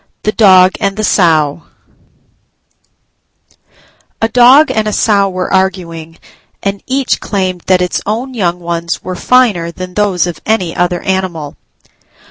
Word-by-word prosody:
THE 215 Hz, -, 0 dB
DOG 185 Hz, -4 st, +5 dB
AND 200 Hz, -2 st, -2 dB
THE 215 Hz, -, -2 dB
SOW 160 Hz, -6 st, +2 dB, 2.6 s
A 225 Hz, -, +1 dB
Dog 255 Hz, +6 st, +5 dB
and 215 Hz, -1 st, -1 dB
a 210 Hz, -, -2 dB
Sow 200 Hz, -2 st, +2 dB
were 185 Hz, 0 st, -4 dB
arguing 170 Hz, -4 st, -2 dB, 0.5 s
and 200 Hz, 0 st, -3 dB
each 265 Hz, 0 st, 0 dB
claimed 185 Hz, -3 st, -3 dB
that 185 Hz, -1 st, +3 dB
its 180 Hz, -, -2 dB
own 240 Hz, +5 st, -3 dB
young 180 Hz, -6 st, -1 dB
ones 170 Hz, -1 st, -4 dB
were 185 Hz, -, -5 dB
finer 205 Hz, -6 st, +2 dB
than 180 Hz, +1 st, -8 dB
those 195 Hz, -3 st, +1 dB
of 175 Hz, -3 st, -6 dB
any 185 Hz, -7 st, -1 dB
other 175 Hz, 0 st, -1 dB
animal. 180 Hz, -6 st, -3 dB
185 Hz, 135 wpm, -12 LUFS, 175-215 Hz, 2.6 s, DOG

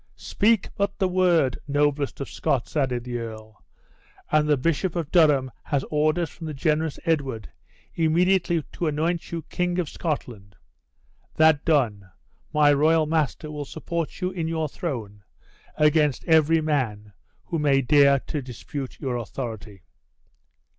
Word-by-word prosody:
Speak 215 Hz, -1 st, +1 dB
but 200 Hz, 0 st, -1 dB
the 190 Hz, -, +1 dB
word, 175 Hz, -8 st, +2 dB
noblest 145 Hz, 0 st, 0 dB
of 140 Hz, -, -4 dB
Scots," 130 Hz, +2 st, -2 dB
added 130 Hz, -5 st, 0 dB
the 120 Hz, -1 st, -4 dB
earl, 110 Hz, -2 st, -9 dB, 0.7 s
"and 150 Hz, 0 st, +3 dB
the 150 Hz, -, +4 dB
bishop 165 Hz, +6 st, 0 dB
of 165 Hz, -4 st, -3 dB
Durham 145 Hz, -7 st, +4 dB
has 140 Hz, -2 st, -1 dB
orders 155 Hz, +2 st, +1 dB
from 165 Hz, -, -8 dB
the 155 Hz, -, -5 dB
generous 155 Hz, +1 st, 0 dB
Edward 135 Hz, -, -1 dB, 0.4 s
immediately 170 Hz, +1 st, +2 dB
to 170 Hz, -, -2 dB
anoint 165 Hz, +3 st, -1 dB
you 165 Hz, -1 st, -4 dB
king 180 Hz, +3 st, -2 dB
of 180 Hz, -3 st, 0 dB
Scotland 120 Hz, -, -5 dB, 0.8 s
that 160 Hz, -2 st, +4 dB
done, 115 Hz, -, +1 dB, 0.4 s
my 150 Hz, -1 st, +5 dB
royal 155 Hz, +2 st, +3 dB
master 155 Hz, -1 st, -1 dB
will 150 Hz, -1 st, -4 dB
support 165 Hz, +4 st, -5 dB
you 180 Hz, 0 st, -1 dB
in 170 Hz, -3 st, -3 dB
your 160 Hz, -1 st, -1 dB
throne 115 Hz, -, -6 dB, 0.5 s
against 150 Hz, -2 st, +2 dB
every 160 Hz, 0 st, +4 dB
man 115 Hz, -9 st, -2 dB, 0.3 s
who 170 Hz, -3 st, -2 dB
may 140 Hz, -2 st, +3 dB
dare 140 Hz, 0 st, +5 dB
in 150 Hz, -3 st, -2 dB
dispute 130 Hz, +2 st, -7 dB
your 130 Hz, -4 st, -2 dB
authority." 110 Hz, -5 st, -7 dB
150 Hz, 140 wpm, -24 LUFS, 130-165 Hz, 0.8 s, my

